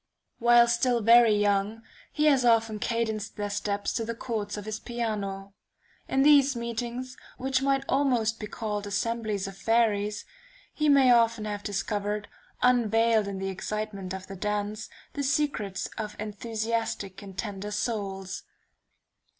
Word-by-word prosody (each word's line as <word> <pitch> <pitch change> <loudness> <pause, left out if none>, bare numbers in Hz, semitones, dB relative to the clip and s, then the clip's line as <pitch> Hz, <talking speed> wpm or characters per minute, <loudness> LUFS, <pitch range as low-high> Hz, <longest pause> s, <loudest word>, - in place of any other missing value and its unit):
While 240 0 +6
still 235 0 +2
very 230 0 +6
young, 205 +2 +1 0.3
he 300 - 0
has 275 -4 +5
often 225 -2 +3
cadenced 220 -1 -2
their 205 -1 -3
steps 200 0 -2
to 230 - -1
the 230 +1 -4
chords 215 -3 -4
of 205 - -6
his 215 0 -4
piano. 200 -5 -4 0.5
In 270 0 +2
these 280 -2 +6
meetings, 235 +2 -4 0.2
which 265 0 0
might 275 0 +1
almost 240 -6 +1
be 210 - -5
called 210 -2 -4
assemblies 215 -1 -1
of 195 - -8
fairies, 210 -1 +1 0.5
he 305 -1 +1
may 275 -3 +6
often 230 -2 +3
have 205 -1 -4
discovered, 205 +1 -2 0.4
unveiled 225 -3 +3
in 200 -1 -4
the 195 0 -3
excitement 200 0 -4
of 190 0 -5
the 195 - -8
dance, 210 +2 -3 0.2
the 285 - -3
secrets 275 -9 -1
of 210 -1 -4
enthusiastic 215 -2 -3
and 195 -2 -11
tender 205 -2 -4
souls. 195 -3 -3
220 Hz, 140 wpm, -27 LUFS, 205-235 Hz, 0.5 s, While